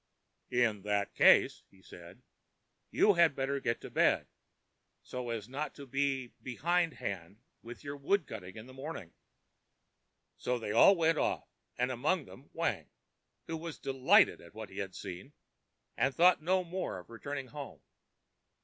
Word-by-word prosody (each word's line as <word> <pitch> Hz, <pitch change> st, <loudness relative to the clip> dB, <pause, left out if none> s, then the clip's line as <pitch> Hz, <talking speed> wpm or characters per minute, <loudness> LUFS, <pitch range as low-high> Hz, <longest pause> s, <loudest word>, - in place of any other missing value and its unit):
ãIn 115 Hz, -4 st, +2 dB
that 100 Hz, 0 st, -1 dB
case,ã 95 Hz, -1 st, +4 dB
said 85 Hz, 0 st, -13 dB, 0.7 s
he, -, -, -13 dB
ãyou 205 Hz, -, +6 dB
had 170 Hz, -4 st, +5 dB
better 140 Hz, +1 st, -1 dB
get 115 Hz, -3 st, -1 dB
to -, -, -9 dB
bed, -, -, +3 dB, 0.8 s
so 125 Hz, -1 st, -5 dB
as 115 Hz, -3 st, -4 dB
not 145 Hz, +4 st, -4 dB
to 140 Hz, -, -9 dB
be 135 Hz, -2 st, -1 dB
behindhand 130 Hz, -, -1 dB, 0.2 s
with 120 Hz, +4 st, -10 dB
your 140 Hz, 0 st, -5 dB
wood 155 Hz, +6 st, +1 dB
cutting 90 Hz, 0 st, -8 dB
in 110 Hz, -, -8 dB
the 130 Hz, -, -13 dB
morning.ã 135 Hz, -, -7 dB, 1.3 s
So 125 Hz, 0 st, 0 dB
they 110 Hz, -3 st, -4 dB
all 120 Hz, -, +7 dB
went 165 Hz, -2 st, +2 dB
off, -, -, -1 dB, 0.3 s
and 125 Hz, +1 st, +1 dB
among 145 Hz, +6 st, 0 dB
them 135 Hz, -, -15 dB
Wang, -, -, -2 dB, 0.6 s
who 165 Hz, -, -4 dB
was 165 Hz, -1 st, -7 dB
delighted 135 Hz, -1 st, +4 dB
at -, -, -16 dB
what -, -, -8 dB
he -, -, -7 dB
had -, -, -4 dB
seen, 90 Hz, +11 st, -8 dB, 0.6 s
and 135 Hz, 0 st, +1 dB
thought 175 Hz, 0 st, +5 dB
no 185 Hz, +3 st, +2 dB
more 180 Hz, -, -4 dB
of 90 Hz, +5 st, -12 dB
returning 135 Hz, +3 st, -5 dB
home. 145 Hz, -3 st, -8 dB
135 Hz, 155 wpm, -32 LUFS, 115-155 Hz, 1.3 s, all